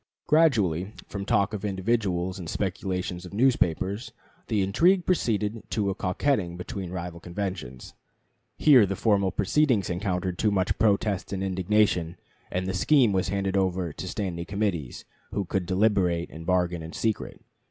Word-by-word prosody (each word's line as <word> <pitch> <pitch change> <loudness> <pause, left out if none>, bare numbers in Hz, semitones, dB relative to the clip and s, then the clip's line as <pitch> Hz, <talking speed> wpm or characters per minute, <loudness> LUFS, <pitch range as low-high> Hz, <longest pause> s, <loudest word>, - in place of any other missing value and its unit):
Gradually, 105 - +2
from 100 -1 -5
talk 100 +1 +2
of 105 - -4
individuals 95 -2 -1
and 85 -3 -6
speculations 90 -2 -3
of 90 +2 -9
newspapers, 105 -3 +1 0.4
the 105 -3 +1
intrigue 170 - +3
proceeded 110 - 0
to 100 -3 0
a - - -1
coquetting 90 -1 -1
between 95 0 -5
rival 90 -1 -5
conventions. 85 -8 -5 0.6
Here 130 -9 +6
the 95 - -2
formal 100 -2 +2
proceedings 105 - +1
encountered 90 -1 -2
too 105 - +3
much 95 -2 0
protest 100 -2 +1
and 95 -1 -2
indignation, 95 -2 +1 0.3
and 90 +1 -2
the 95 - -2
scheme 125 +4 +4
was 95 0 0
handed 100 0 -1
over 95 -4 0
to 95 - -6
standing 90 -4 -3
committees, 100 - -3 0.3
who 100 - -1
could 90 0 -2
deliberate 95 -3 +1
and 80 +1 -9
bargain 90 -2 +1
in 80 +1 -8
secret. 110 -2 -2
95 Hz, 150 wpm, -26 LUFS, 90-105 Hz, 0.6 s, Here